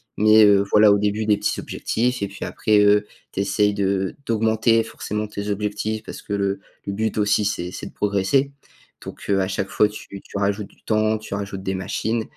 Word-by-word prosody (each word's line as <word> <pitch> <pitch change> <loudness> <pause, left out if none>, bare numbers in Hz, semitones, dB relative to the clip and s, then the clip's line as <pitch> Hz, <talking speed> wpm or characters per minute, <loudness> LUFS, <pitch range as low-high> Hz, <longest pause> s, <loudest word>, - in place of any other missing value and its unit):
Mais 110 +1 +6
heu, 100 -1 +5
voilà 105 -1 +6
au - - +3
début 105 +1 -1
des 105 -1 +4
petits - - -1
objectifs 125 0 -2
et 100 - -1
puis 100 - -7
après, 105 -1 +2
heu, 105 0 +4 0.3
tu 100 - -1
essayes 100 +1 +2
de 95 -1 -1
d'augmenter 115 0 +2
forcément 105 -1 -4
tes 105 0 -5
objectifs 105 +1 -2
parce - - -8
que - - -12
le 100 -1 -1 0.2
le 100 - -3
but 110 +2 -2
aussi 105 0 +2
c'est 90 -3 -2
c'est - - -6
de - - -11
progresser. 105 +8 +1 0.5
Donc - - -9
heu, 100 -1 +3
à 95 - -1
chaque 95 0 -2
fois 105 - +3
tu 105 - -10
tu - - -8
rajoutes 100 0 -1
du - - -26
temps 110 0 +1
tu 110 -1 -8
rajoutes 100 -1 -5
des 95 0 -2
machines 110 +4 -2
105 Hz, 210 wpm, -22 LUFS, 100-110 Hz, 0.5 s, Mais